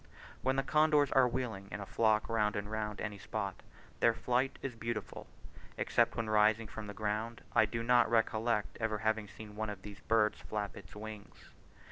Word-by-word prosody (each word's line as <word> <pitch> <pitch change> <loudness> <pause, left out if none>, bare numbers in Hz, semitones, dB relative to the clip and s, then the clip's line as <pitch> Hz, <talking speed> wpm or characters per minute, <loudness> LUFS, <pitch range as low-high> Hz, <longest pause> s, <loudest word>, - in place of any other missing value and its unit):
When 130 +1 +1
the 135 - +1
condors 150 -1 +4
are 130 -2 +5
wheeling 115 -6 -3
in - - -5
a 100 - -5
flock 110 +1 +2
round 105 -2 +1
and 105 +1 -3
round 105 -1 -3
any 105 -2 -4
spot, 100 -3 -4 0.4
their 115 -1 +4
flight 125 +3 0
is 135 - -3
beautiful. 115 -1 -4 0.5
Except 115 0 +2
when 115 - -2
rising 110 +1 +4
from 110 -1 -7
the 105 - -7
ground, 110 +2 -2
I 110 -2 +6
do 115 +2 -3
not 120 -1 +4
recollect 115 -1 +1
ever 115 -2 0
having 110 0 0
seen 105 0 -11
one 110 0 -2
of 100 -2 -7
these 100 -2 -9
birds 105 +1 +2
flap 105 -2 -4
its 95 0 -12
wings. 105 -1 -10
110 Hz, 185 wpm, -33 LUFS, 105-115 Hz, 0.5 s, I